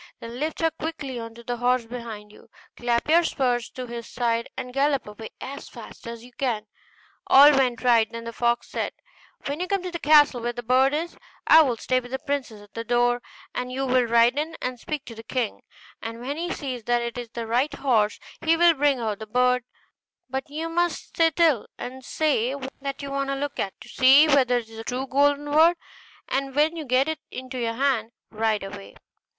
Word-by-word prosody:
Then 230 +2 -8
lift 310 +3 -3
her 325 0 +3
quickly 305 -6 -5
on 230 0 -8
to 235 - -12
the 245 +1 -3
horse 245 0 +1
behind 225 -3 -8
you; 215 - -18 0.3
clap 240 -1 0
your 335 +3 +5
spurs 250 -6 0
to 255 - -7
his 235 -1 -7
side, 235 -1 -1
and 250 - -5
gallop 275 0 +1
away 210 +1 -9
as 280 +2 -7
fast - - -11
as 235 0 -7
you 250 - -15
can.' 235 -4 -2 0.6
All 285 +2 +9
went 255 -5 +1
right: 230 -3 +4
then 230 0 -6
the 230 0 -6
fox 240 +1 0
said, - - -3 0.5
'When 285 +3 -3
you 360 - -2
come 395 -1 -1
to 365 - -4
the 340 - -4
castle 295 -5 +5
where 240 +1 -2
the 240 - -6
bird 260 +4 +3
is, 335 +3 -3 0.3
I 320 - +8
will 255 -6 +1
stay 255 +3 +1
with 245 -1 -11
the 265 - -2
princess 265 -8 -4
at 205 - -20
the 230 - -4
door, 245 +1 +2 0.3
and 250 0 -3
you 270 +1 -2
will 255 -1 +3
ride 235 +3 +4
in 320 +2 -4
and 250 -1 -4
speak 300 +3 -5
to 230 - -9
the 225 - -9
king; 235 -1 -3 0.4
and 230 +1 -6
when 265 +4 -4
he 345 +3 -3
sees 255 -6 -5
that 240 0 +1
it 235 0 -4
is 240 -2 -6
the 235 0 -5
right 250 +6 +1
horse, 235 -7 +1 0.3
he 325 +1 +3
will 345 0 +6
bring 285 -3 +2
out 215 -3 -2
the 220 - -7
bird; 250 +2 +2 0.6
but 265 +1 -4
you 315 +3 -4
must 345 +1 -2
sit 325 -1 +3
still, 320 -10 +3
and 260 +1 -7
say 270 -4 0 0.3
that 275 0 -5
you 280 - -5
want 275 0 -1
to 275 - 0
look 285 +1 -4
at 195 - -1
it, - - -55
to - - -12
see 270 +4 +6
whether 260 -4 +4
it 235 -2 -4
is 225 0 -13
the 225 - -6
true 250 +3 -3
golden 285 +2 +2
bird; 320 +4 +4 0.5
and 270 0 -2
when 305 +3 +3
you 320 -2 -5
get 255 +2 +2
it 315 -1 -2
into 255 0 -6
your 230 -1 -1
hand, 250 -4 0 0.2
ride 220 -1 0
away. 195 0 -9
255 Hz, 225 wpm, -25 LUFS, 235-285 Hz, 0.6 s, All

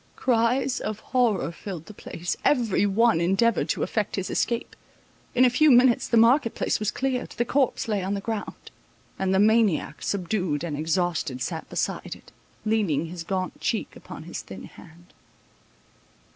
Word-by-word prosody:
Cries 250 +2 +1
of 215 0 -4
horror 230 -8 +1
filled 170 -2 -8
the 215 - -11
place—every 205 - 0
one 220 -2 +3
endeavoured 195 +6 +2
to - - 0
effect 215 -3 -1
his 190 -2 -3
escape—in 240 +1 -2
a - - +6
few 305 +5 +4
minutes 250 -2 +5
the 235 - +2
market 230 +2 +4
place - - 0
was 215 -1 0
cleared—the 255 -2 -2
corpse 265 0 0
lay 210 -3 0
on 195 +2 -1
the - - -2
ground; 215 +1 -6 0.5
and 190 -1 0
the 190 - +3
maniac, 215 -3 +2
subdued 180 -5 -1
and 160 -4 -3
exhausted, 160 -3 -1
sat 160 +5 -4
beside - - -3
it, - - -18 0.3
leaning 200 -9 +1
his 170 -1 -6
gaunt 185 +1 -3
cheek 225 - -2
upon - - -10
his - - -6
thin - - -10
hand. 175 +1 -15
210 Hz, 155 wpm, -25 LUFS, 175-235 Hz, 0.5 s, a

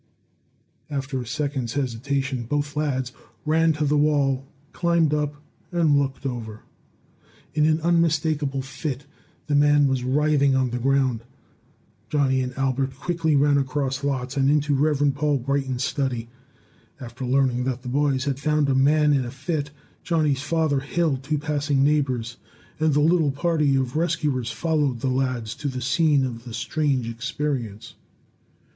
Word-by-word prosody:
After 135 -2 -3
a 120 - -8
second's 140 -3 -2
hesitation, 130 -1 -2
both 145 +3 -2
lads 130 -4 -1 0.3
ran 160 +1 +3
to 150 0 -1
the 145 +1 +2
wall, 140 -3 +1 0.3
climbed 170 -3 +2
up, 150 -1 -1 0.4
and 165 -4 +3
looked 140 -1 -1
over. 115 -4 -5 0.9
In 155 0 +3
an 155 0 +2
unmistakable 155 -4 +1
fit, 135 +1 -5 0.4
the 150 - -2
man 145 0 +5
was 135 -2 0
writhing 140 +1 +2
on 130 -2 +1
the 125 - -2
ground. 130 -2 +1 0.9
Johnny 135 -3 +2
and 125 0 -3
Albert 135 0 0
ran 130 - -23
quickly 165 -1 0
across 140 -1 +1
lots 130 -2 -2
and 135 -1 +2
into 150 0 +2
Rev. 145 0 +2
Paul 145 0 +1
Brighton's 135 0 -1
study. 125 -5 -2 0.7
After 125 +1 -8
learning 125 -1 +1
that 130 -1 -3
the - - -8
boys 140 +1 +1
had 140 -1 -1
found 150 0 +1
a - - +3
man 150 +3 +4
in 135 -2 +2
a 120 - -5
fit, 140 +3 -3 0.3
Johnny's 150 -5 +1
father 155 -1 +1
hailed 145 -1 -1
two 150 +3 -1
passing 145 -2 0
neighbors, 130 -5 0 0.4
and 155 -2 +2
the 150 - +4
little 160 -1 +3
party 150 -1 +1
of 130 -1 -1
rescuers 145 -7 0
followed 145 -5 0
the 135 - 0
lads 125 -4 -1
to 145 - -4
the 130 -2 -3
scene 140 +2 +2
of 115 -2 -6
the 120 -2 -7
strange 130 0 -1
experience. 115 -2 -4
140 Hz, 150 wpm, -24 LUFS, 130-150 Hz, 0.9 s, man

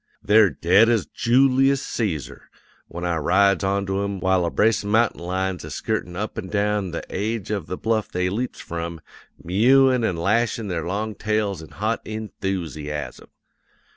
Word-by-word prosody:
They're 105 -1 +5
dead 100 +8 +4
as 115 -5 +2
Joolius 135 +2 +2
Cæsar 95 - -3 0.5
when 85 +2 -6
I 85 -2 0
rides 100 +5 +3
onto 100 0 0
'em, 100 -1 -3
while 95 -1 +2
a - - 0
brace 110 +5 +2
of 100 - -5
mountain 115 +1 +2
lions 95 +1 -2
is - - -7
skirtin' 90 -1 -3
up 105 +3 -4
an' 95 - -6
down 105 -1 0
the 85 - -5
aige 105 +1 -3
of 100 -3 -3
the 90 - -4
bluff 110 -2 0
they 90 0 -1
leaps 115 +7 -3
from, 85 0 -5 0.4
mewin' 125 +7 +4
an' 95 -6 0
lashin' 110 +4 0
their 85 -2 -3
long 105 +4 -2
tails 105 -3 -1
in 80 - -11
hot 110 +3 -2
enthoosiasm. 85 - -5
100 Hz, 165 wpm, -23 LUFS, 90-110 Hz, 0.5 s, They're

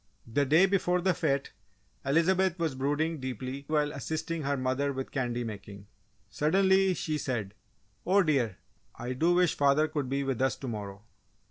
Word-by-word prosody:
The 135 +5 0
day 160 +7 +6
before 180 -2 +1
the 185 +1 +2
fête 140 -5 0 0.5
Elizabeth 180 +5 +2
was 165 -4 -1
brooding 145 +4 -1
deeply 130 +2 -5
while 150 -1 +1
assisting 160 +3 -3
her 140 0 -1
mother 130 +2 0
with 135 -1 -5
candy 120 -3 -2
making. 100 -2 -8 0.4
Suddenly, 190 - +3
she 155 -3 -2
said, 110 -8 -3 0.5
"Oh, 195 +2 +4
dear! 130 - +1 0.4
I 125 +1 -4
do 165 +7 +2
wish 180 -2 +3
father 145 +2 +3
could 145 -4 -3
be 140 +1 0
with 135 -3 -2
us 130 - +2
to 135 - -8
morrow!" 100 -3 -6
140 Hz, 160 wpm, -29 LUFS, 130-165 Hz, 0.5 s, day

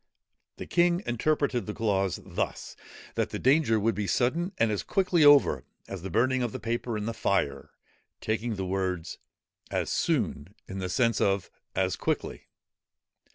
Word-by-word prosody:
The - - -6
king 175 +1 +2
interpreted 125 0 0
the 105 - -4
clause 100 -4 0
thus, - - -4 0.4
that - - -1
the - - -4
danger 130 -4 +3
would 115 +2 +1
be 100 0 -3
sudden 165 - +1
and 115 -2 +2
as 105 -4 -1
quickly 180 - +2
over 145 - +6 0.2
as 95 -3 -6
the 95 - -5
burning 130 +6 +2
of 120 -2 -1
the - - -6
paper 115 0 -2
in 105 - -3
the 115 - -2
fire, 70 -11 -1 0.5
taking 110 +1 -2
the 95 -1 -3
words 90 -3 -2 0.5
as - - -1
soon 80 +8 -1
in 95 - -6
the 90 -1 -3
sense 115 +4 +1
of 100 -1 +1 0.2
as 95 -1 +1
quickly. - - -3
110 Hz, 160 wpm, -28 LUFS, 95-130 Hz, 0.5 s, over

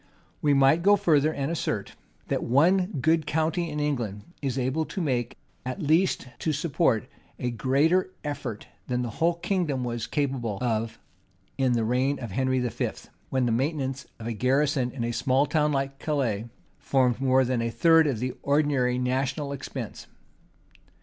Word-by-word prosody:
And - - -33 0.3
we 145 -1 +3
might 135 +4 +5
go 200 +3 +6
further, 155 -6 +3
and 140 0 -2
assert, 115 -11 -3 0.3
that - - -1
one 180 +9 +3 0.2
good 160 -1 +2
county 160 +2 0
in 150 0 -4
England 120 -9 -2 0.2
is 135 -2 -2
able 130 +5 0
to 195 - -6
make, 130 -8 -1 0.3
at 130 +9 -4
least 160 0 +2
to 160 - 0
support, 150 - +1 0.3
a 125 - -2
greater 145 +10 +2
effort 135 -7 -5 0.2
than 125 -1 -1
the 120 - -4
whole 170 +1 +3
kingdom 170 -7 -1
was 120 -2 -3
capable 130 -8 -1
of 115 -2 -1 0.6
in 130 -2 +3
the 115 -1 +1
reign 130 +4 +1
of 120 -6 -6
Henry 130 +4 +1
V.; 125 -3 -1 0.4
when 130 -1 +1
the 120 - +1
maintenance 135 +1 -1
of 110 - -9
a 115 - -2
garrison 130 +2 +1
in 125 -1 -5
a 120 - -1
small 130 +3 +2
town 150 0 +1
like 135 -1 -2
Calais, 125 -9 -1 0.3
formed 130 -2 +1
more 130 0 +4
than 125 -1 0
a 115 - -1
third 160 +7 +5
of 135 -5 0
the 125 +3 -2
ordinary 140 -4 +2
national 130 +3 -1
expense. 140 - -6
135 Hz, 170 wpm, -26 LUFS, 125-150 Hz, 0.6 s, go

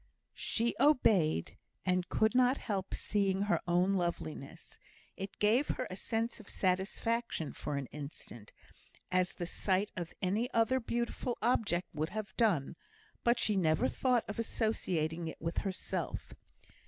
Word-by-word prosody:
She 235 -1 0
obeyed, 210 - +3 0.3
and 180 -1 +1
could 220 +1 +3
not 255 +1 +4
help 195 -4 -3
seeing 195 -2 +1
her 175 -5 +1
own 180 +3 +3
loveliness; 170 - -4 0.4
it 195 +1 -6
gave 230 +7 +3
her 255 - -1
a - - -4
sense 225 +4 -1
of 215 - -13
satisfaction 190 -1 0
for 145 -1 -3
an 140 - -2
instant, 140 -7 -8 0.6
as 185 0 +2
the 175 - -3
sight 190 +3 0
of 175 -2 -4
any 215 +7 0
other 230 +3 +4
beautiful 235 +1 -2
object 205 -7 +2
would 155 +1 -1
have 215 -1 -5
done, 170 - +2 0.5
but 235 0 +4
she 215 -3 +2
never 175 +6 +3
thought 250 -4 +1
of 210 - -5
associating 175 -8 -1
it 160 - -7
with 165 0 -1
herself. 190 -2 -3
195 Hz, 140 wpm, -33 LUFS, 175-230 Hz, 0.6 s, not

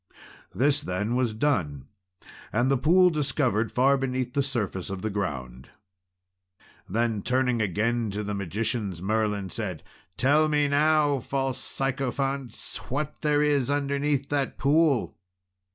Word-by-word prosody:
This 145 +3 +2
then 105 +1 -2
was 125 -4 0
done, 80 - -1 0.6
and 120 +4 +2
the 135 - +3
pool 180 +6 +5
discovered 130 -7 0
far 135 +2 +3
beneath 130 -1 -2
the 140 - +2
surface 110 -9 -2
of 95 0 -5
the 110 - -1
ground. 65 -10 -4 1.2
Then, 110 +1 0
turning 125 -1 +1
again 110 +3 0
to 105 +2 -3
the 105 0 -3
magicians, 100 0 -2
Merlin 105 -1 -1
said, 95 -8 -5 0.3
"Tell 150 +4 +3
me 150 -1 +2
now, 145 0 +3
false 135 0 -2
sycophants, 135 -2 -3
what 145 +3 -3
there 150 -1 +2
is 145 -4 +2
underneath 140 0 0
that 140 -2 -1
pool?" 145 -2 +2
125 Hz, 130 wpm, -26 LUFS, 105-140 Hz, 1.2 s, pool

